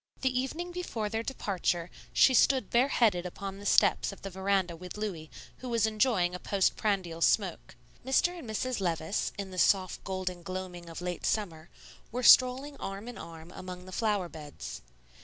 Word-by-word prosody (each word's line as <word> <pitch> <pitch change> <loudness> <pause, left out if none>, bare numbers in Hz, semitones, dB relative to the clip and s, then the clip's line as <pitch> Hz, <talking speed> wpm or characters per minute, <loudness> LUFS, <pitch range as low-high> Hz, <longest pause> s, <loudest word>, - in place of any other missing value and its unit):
The 255 -1 +1
evening 330 +7 -3
before 245 -12 -3
their 225 +1 -1
departure 185 -8 -2 0.2
she 260 - +5
stood 260 +1 +4
bareheaded 235 -7 +3
upon 195 +2 -6
the 205 - -5
steps - - +4
of 200 - -13
the 195 - -5
veranda 190 -2 0
with 180 +4 -9
Louis, 180 -7 -4 0.3
who 255 - -7
was 230 -2 +2
enjoying 215 -5 +2
a 180 - -5
post 195 0 +1
prandial 185 -6 -1
smoke. 185 -1 +1 0.3
Mr. 345 +7 +2
and 245 - -9
Mrs. 240 +1 -2
Levice, 165 +1 -1
in 195 -1 -5
the 185 - -4
soft 185 -1 +2
golden 185 -2 -3
gloaming 185 -2 -6
of 165 - -7
late 180 -1 -4
summer, 170 -6 -2 0.4
were 250 +2 -3
strolling 260 +4 +6
arm 195 +3 -6
in 245 - -7
arm 165 0 -10
among 180 0 -8
the 185 - -10
flower 205 -3 0
beds. 150 -3 -8
195 Hz, 175 wpm, -30 LUFS, 180-235 Hz, 0.4 s, strolling